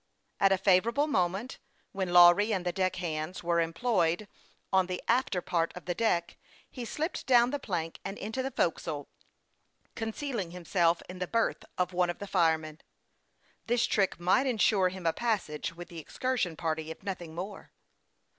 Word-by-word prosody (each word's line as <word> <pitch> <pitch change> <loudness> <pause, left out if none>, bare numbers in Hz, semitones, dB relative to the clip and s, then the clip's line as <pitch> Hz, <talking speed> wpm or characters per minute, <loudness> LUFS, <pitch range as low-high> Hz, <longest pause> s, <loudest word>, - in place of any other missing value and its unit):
At 195 -1 +5
a 195 - +4
favorable 210 +9 +3
moment, 195 - -1 0.3
when 190 -2 -2
Lawry 175 +5 +7
and 185 -4 -1
the 175 - +1
deck 185 0 0
hands 165 -1 -4
were 170 0 +2
employed 175 +1 0 0.5
on 190 -1 +4
the 185 -1 -3
after 235 -6 +1
part 165 -2 0
of 180 - -9
the 175 - -1
deck, 175 -5 0 0.3
he 245 -3 -6
slipped 315 +8 -3
down 245 -1 +5
the 290 - -2
plank 170 -9 -3
and 195 +1 -5
into 220 +5 -3
the 265 - -2
forecastle, 160 - -2 0.8
concealing 225 - -3
himself 170 -1 +1
in 180 0 -9
the 180 - -2
berth 230 +3 0
of 180 0 0
one 180 0 +2
of 175 - -3
the 200 - -6
fire 170 -5 +3
men. 155 0 -10 0.9
This 240 +1 +2
trick 195 -4 +1
might 185 +10 +3
insure 210 -6 +3
him 185 -1 -9
a 165 - +3
passage 190 -9 -2
with 175 0 -9
the 170 - -8
excursion 220 - -2
party, 160 -1 -2
if 160 - -9
nothing 175 -5 -5
more. 190 +3 -7
185 Hz, 175 wpm, -30 LUFS, 170-220 Hz, 0.9 s, Lawry